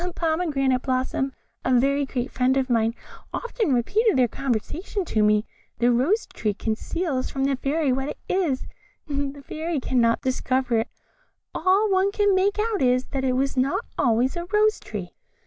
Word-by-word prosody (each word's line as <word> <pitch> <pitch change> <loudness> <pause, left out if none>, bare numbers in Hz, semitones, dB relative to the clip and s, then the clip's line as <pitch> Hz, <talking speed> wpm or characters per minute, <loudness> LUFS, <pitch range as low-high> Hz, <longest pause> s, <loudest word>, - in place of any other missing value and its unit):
A 360 - -2
pomegranate 310 -7 0
blossom, 260 +1 -1 0.3
a 255 - +2
very 280 +2 +1
great 255 -1 -3
friend 260 +1 +2
of 260 -1 0
mine, 230 0 +2 0.4
often 470 - -2
repeated 395 - +2
their 250 -1 +4
conversation 275 - -3
to 220 - 0
me. 210 +1 +3 0.3
The 240 +1 +3
Rose 290 - +2
tree 210 -3 -3
conceals 260 - -2
from 270 - -2
the 275 0 +2
Fairy 280 +1 0
what 270 +2 -2
it - - -6
is 335 -9 0 0.4
the 280 -1 -3
Fairy 320 -1 -2
cannot 235 -3 +2
discover 255 -2 0
it; 225 - -1 0.7
all 390 +3 +3
one 380 +1 +3
can 410 -1 +2
make 390 +2 +2
out 430 -1 0
is, 255 0 +3
that 270 -1 -2
it 260 -1 +1
was 270 +2 0
not 260 +2 0
always 245 +3 +2
a 345 0 -4
rose 425 +3 +2
tree." - - -7
270 Hz, 170 wpm, -24 LUFS, 255-350 Hz, 0.7 s, their